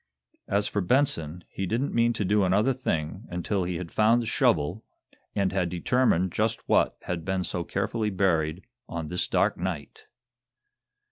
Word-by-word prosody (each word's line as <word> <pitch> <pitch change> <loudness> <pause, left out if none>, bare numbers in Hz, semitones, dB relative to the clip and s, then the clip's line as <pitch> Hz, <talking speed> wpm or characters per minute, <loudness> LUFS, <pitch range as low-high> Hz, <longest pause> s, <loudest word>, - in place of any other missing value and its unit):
As 100 +1 +1
for 105 - -1
Benson, 90 - +1
he 95 - -4
didn't 120 +8 -1
mean 120 0 +3
to 105 - -2
do 105 +2 +3
another 105 +8 +3
thing 95 -5 -3
until 90 +2 -1
he 90 0 -2
had 85 -1 -5
found 110 +2 +4
the 120 - -2
shovel, 90 -1 +1 0.5
and 100 -2 +1
had 90 -2 0
determined 90 0 +2
just 110 +4 -1
what - - +3
had 85 -2 -3
been 95 0 -1
so 90 -1 -2
carefully 105 +4 -1
buried 90 -3 +1 0.3
on 80 -2 -4
this 90 - -1
dark - - +2
night! 85 -5 -5
95 Hz, 160 wpm, -27 LUFS, 85-110 Hz, 0.5 s, found